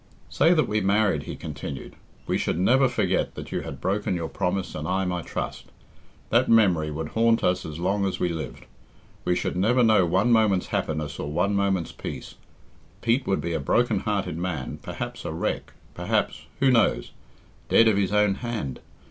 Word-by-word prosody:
"Say 170 Hz, +2 st, +4 dB
that 155 Hz, -, +2 dB
we 105 Hz, +1 st, 0 dB
married," 95 Hz, -6 st, +2 dB
he -, -, -4 dB
continued; 70 Hz, -2 st, -7 dB, 0.3 s
"we -, -, 0 dB
should -, -, -1 dB
never 130 Hz, +8 st, +4 dB
forget 125 Hz, -, 0 dB
that -, -, -8 dB
you -, -, -2 dB
had 70 Hz, -, -7 dB
broken 95 Hz, +3 st, -1 dB
your 85 Hz, -2 st, -3 dB
promise 95 Hz, +1 st, -2 dB
and 75 Hz, 0 st, -4 dB
I 95 Hz, +1 st, 0 dB
my 90 Hz, -1 st, -2 dB
trust. -, -, -5 dB, 0.7 s
That -, -, +3 dB
memory 95 Hz, -9 st, +4 dB
would 75 Hz, +1 st, -4 dB
haunt 115 Hz, 0 st, +2 dB
us 90 Hz, -1 st, +1 dB
as 75 Hz, -1 st, -7 dB
long 100 Hz, +3 st, 0 dB
as 90 Hz, -2 st, -3 dB
we 90 Hz, -, +1 dB
lived. 80 Hz, -6 st, -6 dB, 0.6 s
We 90 Hz, -, +2 dB
should -, -, -2 dB
never 115 Hz, +7 st, +3 dB
know 110 Hz, -4 st, +5 dB
one 95 Hz, +8 st, +2 dB
moment's 110 Hz, -5 st, +3 dB
happiness 75 Hz, -2 st, -2 dB
or 75 Hz, -, -4 dB
one 90 Hz, +6 st, +1 dB
moment's 100 Hz, -3 st, 0 dB
peace. -, -, -7 dB, 0.7 s
Pete 120 Hz, +3 st, +1 dB
would 95 Hz, -, +1 dB
be 85 Hz, 0 st, -3 dB
a 80 Hz, -, 0 dB
broken 70 Hz, -, +2 dB
hearted 80 Hz, -, -2 dB
man, 85 Hz, -7 st, -4 dB
perhaps -, -, -6 dB
a -, -, -4 dB
wreck, -, -, -3 dB, 0.2 s
perhaps -, -, -1 dB
who 135 Hz, -1 st, +4 dB
knows? 110 Hz, -, +2 dB, 0.6 s
dead 115 Hz, -, +6 dB
of 110 Hz, -, +4 dB
his 100 Hz, -2 st, +1 dB
own 105 Hz, -1 st, +3 dB
hand. 115 Hz, -, -4 dB
95 Hz, 185 wpm, -25 LUFS, 80-110 Hz, 0.7 s, dead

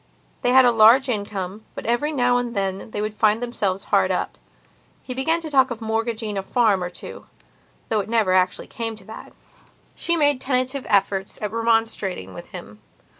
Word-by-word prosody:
They 245 Hz, -, +1 dB
had 260 Hz, 0 st, +7 dB
a 245 Hz, -, +5 dB
large 235 Hz, +4 st, +6 dB
income, 205 Hz, -2 st, -4 dB
but -, -, -7 dB
every 240 Hz, +6 st, 0 dB
now 245 Hz, -4 st, +2 dB
and 245 Hz, -1 st, -3 dB
then 195 Hz, +1 st, -2 dB
they 210 Hz, -, -4 dB
would 215 Hz, 0 st, -3 dB
find 215 Hz, 0 st, +2 dB
themselves 205 Hz, -6 st, -2 dB
hard -, -, +4 dB
up. -, -, -2 dB, 0.7 s
He 255 Hz, -, -5 dB
began 320 Hz, +6 st, +1 dB
to 320 Hz, -, -6 dB
talk 265 Hz, -2 st, +4 dB
of 240 Hz, -2 st, -5 dB
mortgaging 225 Hz, -2 st, -2 dB
a -, -, -2 dB
farm 205 Hz, -2 st, +1 dB
or 180 Hz, -, -3 dB
two, 175 Hz, -, -11 dB, 0.6 s
though 220 Hz, -, +1 dB
it 205 Hz, -, -4 dB
never 220 Hz, -5 st, +2 dB
actually 185 Hz, 0 st, +1 dB
came 225 Hz, -1 st, -5 dB
to 215 Hz, -, -15 dB
that. 220 Hz, -, -11 dB, 0.6 s
She 340 Hz, 0 st, +1 dB
made 290 Hz, -4 st, +3 dB
tentative 255 Hz, +1 st, -1 dB
efforts 195 Hz, -1 st, 0 dB
at 210 Hz, -, -4 dB
remonstrating 225 Hz, -, -1 dB
with -, -, -10 dB
him. -, -, -11 dB
225 Hz, 185 wpm, -22 LUFS, 200-245 Hz, 0.7 s, had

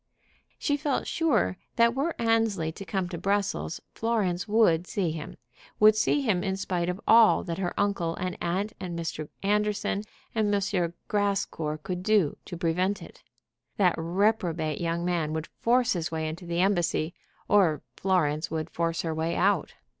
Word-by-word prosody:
She 290 Hz, -1 st, 0 dB
felt 290 Hz, -1 st, -1 dB
sure 245 Hz, -, +1 dB, 0.2 s
that 235 Hz, 0 st, +4 dB
were 285 Hz, +6 st, -1 dB
Annesley 225 Hz, -8 st, +1 dB
to 195 Hz, -, -9 dB
come 185 Hz, +1 st, -1 dB
to 170 Hz, -2 st, -5 dB
Brussels, 195 Hz, -, -1 dB
Florence 200 Hz, -7 st, 0 dB
would 195 Hz, -6 st, +3 dB
see 185 Hz, -5 st, -1 dB
him, 155 Hz, -1 st, -7 dB, 0.4 s
would 215 Hz, 0 st, +7 dB
see 220 Hz, +6 st, +2 dB
him 200 Hz, -9 st, +1 dB
in 190 Hz, -1 st, -1 dB
spite 180 Hz, -2 st, -1 dB
of 180 Hz, +2 st, -3 dB
all 225 Hz, -1 st, +6 dB
that 170 Hz, 0 st, -4 dB
her 180 Hz, -2 st, -2 dB
uncle 195 Hz, -5 st, 0 dB
and 180 Hz, 0 st, -3 dB
aunt, 190 Hz, +5 st, -1 dB
and 175 Hz, -2 st, -5 dB
Mr. 160 Hz, -2 st, -4 dB
Anderson, 210 Hz, 0 st, +1 dB, 0.3 s
and 215 Hz, -2 st, +1 dB
M. 190 Hz, -4 st, 0 dB
Grascour 195 Hz, -7 st, -1 dB
could 180 Hz, -1 st, -3 dB
do 200 Hz, -6 st, +2 dB
to 175 Hz, -, -7 dB
prevent 180 Hz, +4 st, 0 dB
it. -, -, -14 dB, 0.6 s
That 180 Hz, -4 st, +4 dB
reprobate 170 Hz, -3 st, 0 dB
young 170 Hz, 0 st, -1 dB
man 170 Hz, -4 st, 0 dB
would 160 Hz, 0 st, -2 dB
force 245 Hz, +1 st, +3 dB
his 170 Hz, -2 st, -2 dB
way 160 Hz, -1 st, -2 dB
into 170 Hz, +3 st, -6 dB
the 170 Hz, +1 st, 0 dB
embassy, 175 Hz, -3 st, +1 dB, 0.3 s
or 180 Hz, -7 st, +3 dB
Florence 160 Hz, -5 st, +1 dB
would 160 Hz, 0 st, -3 dB
force 165 Hz, -1 st, -1 dB
her 165 Hz, -2 st, -1 dB
way 160 Hz, +2 st, -1 dB
out. 195 Hz, -4 st, +1 dB
180 Hz, 165 wpm, -27 LUFS, 165-205 Hz, 0.6 s, would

